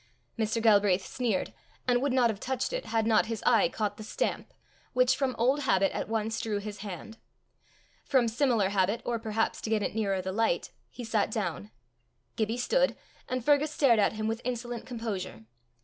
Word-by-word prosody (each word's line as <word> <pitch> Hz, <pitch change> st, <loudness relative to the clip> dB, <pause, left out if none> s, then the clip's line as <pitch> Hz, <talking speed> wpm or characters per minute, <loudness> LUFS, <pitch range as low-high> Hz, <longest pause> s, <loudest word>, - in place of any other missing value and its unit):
Mr. 220 Hz, 0 st, 0 dB
Galbraith 205 Hz, -4 st, +4 dB
sneered, 235 Hz, -7 st, -1 dB, 0.3 s
and 245 Hz, -1 st, +3 dB
would 280 Hz, 0 st, +1 dB
not 250 Hz, -3 st, +4 dB
have 200 Hz, -, -8 dB
touched 260 Hz, -, -2 dB
it -, -, -3 dB
had 225 Hz, -1 st, +1 dB
not 220 Hz, -1 st, +3 dB
his 225 Hz, -2 st, -4 dB
eye 225 Hz, -8 st, +5 dB
caught 210 Hz, +1 st, -2 dB
the 215 Hz, -, -8 dB
stamp, 215 Hz, -, -2 dB, 0.4 s
which 255 Hz, 0 st, +4 dB
from 265 Hz, -3 st, -1 dB
old 260 Hz, +5 st, +3 dB
habit 195 Hz, -8 st, +2 dB
at -, -, -4 dB
once 225 Hz, 0 st, -1 dB
drew 215 Hz, -2 st, -2 dB
his 205 Hz, 0 st, -6 dB
hand. 210 Hz, +2 st, -8 dB, 0.8 s
From 255 Hz, -3 st, +3 dB
similar 230 Hz, -4 st, +2 dB
habit, 200 Hz, +3 st, +1 dB
or 235 Hz, -1 st, -1 dB
perhaps 220 Hz, 0 st, -1 dB
to -, -, -4 dB
get 215 Hz, -2 st, +1 dB
it -, -, -2 dB
nearer 200 Hz, -3 st, 0 dB
the 185 Hz, +1 st, -3 dB
light, 215 Hz, -3 st, 0 dB, 0.2 s
he 245 Hz, -, -8 dB
sat 220 Hz, -2 st, +1 dB
down. 175 Hz, -, -3 dB, 0.7 s
Gibbie 220 Hz, +1 st, -1 dB
stood, -, -, +2 dB, 0.3 s
and 255 Hz, -2 st, -2 dB
Fergus 295 Hz, +1 st, +4 dB
stared 270 Hz, -7 st, +3 dB
at 205 Hz, -, +3 dB
him 215 Hz, 0 st, -3 dB
with 225 Hz, +1 st, -2 dB
insolent 240 Hz, -1 st, -4 dB
composure. 200 Hz, -, -5 dB
225 Hz, 185 wpm, -29 LUFS, 205-245 Hz, 0.8 s, eye